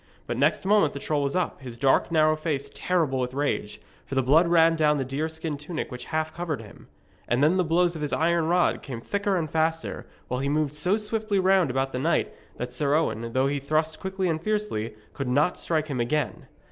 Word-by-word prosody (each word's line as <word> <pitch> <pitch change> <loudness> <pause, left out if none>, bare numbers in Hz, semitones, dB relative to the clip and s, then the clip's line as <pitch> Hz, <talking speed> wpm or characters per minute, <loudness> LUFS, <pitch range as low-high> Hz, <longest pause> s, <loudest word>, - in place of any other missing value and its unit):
But 120 - -3
next 145 +8 +1
moment 200 -6 +4
the 140 - -5
troll 150 +1 -1
was 140 +2 -1
up, 180 -5 -1
his 125 -3 -8
dark 135 +6 +2
narrow 155 -1 +4
face 145 -3 -3
terrible 160 -8 0
with 125 0 -2
rage, 140 -7 -2 0.2
for 135 - -6
the 130 - +2
blood 155 +7 +5
ran 165 -1 +5
down 150 -2 +3
the 135 - -1
deer 140 +5 -2
skin 160 -2 -4
tunic 155 +1 -5
which 125 0 -7
half 155 0 -2
covered 170 -6 -3
him. 105 - -15 0.4
And 125 +3 +2
then 165 +5 +4
the 185 - +3
blows 175 +1 +2
of 160 - -6
his 150 - -2
iron 170 0 +2
rod 175 +1 +2
came 125 -5 -6
thicker 200 - -1
and 165 -3 -1
faster, 160 +1 -1 0.2
while 125 - -2
he 140 +1 -1
moved 150 -1 0
so 180 +7 +2
swiftly 215 -1 -1
round 190 -4 +3
about 135 +1 -1
the 125 - -3
knight 160 +6 +1 0.2
that 125 0 -5
Sir 145 +2 +1
Owen, 115 -7 -1
though 130 +1 +2
he 140 +1 0
thrust 155 +3 0
quickly 190 0 -2
and 160 -2 -1
fiercely, 210 - -2 0.2
could 135 - -4
not 145 +8 +2
strike 155 -2 -1
him 140 -5 -4
again. 130 +4 -1
155 Hz, 225 wpm, -26 LUFS, 135-170 Hz, 0.4 s, blood